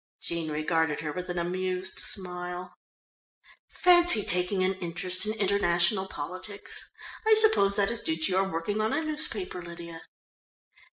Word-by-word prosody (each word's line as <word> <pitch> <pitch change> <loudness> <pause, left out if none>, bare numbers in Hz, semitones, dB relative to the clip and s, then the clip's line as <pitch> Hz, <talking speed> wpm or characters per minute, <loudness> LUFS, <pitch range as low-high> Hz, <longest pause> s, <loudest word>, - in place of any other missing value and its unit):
Jean 170 -2 -4
regarded 155 0 0
her 150 -1 -4
with 180 +2 -6
an 175 - -4
amused 185 +2 -1
smile. 180 -1 0 1.0
"Fancy 350 - +5
taking 180 +1 0
an 185 +1 +1
interest 180 +2 -1
in 215 - 0
international 190 -2 +1
politics. 185 +6 -8 0.4
I 440 - +7
suppose 430 - +4
that 200 +1 +2
is 235 - -2
due 160 - -2
to 160 +3 0
your 190 +1 +1
working 190 +5 -2
on 220 +4 0
a 310 +3 0
newspaper, 310 - -2
Lydia." 170 -1 -9
185 Hz, 140 wpm, -27 LUFS, 170-205 Hz, 1.0 s, I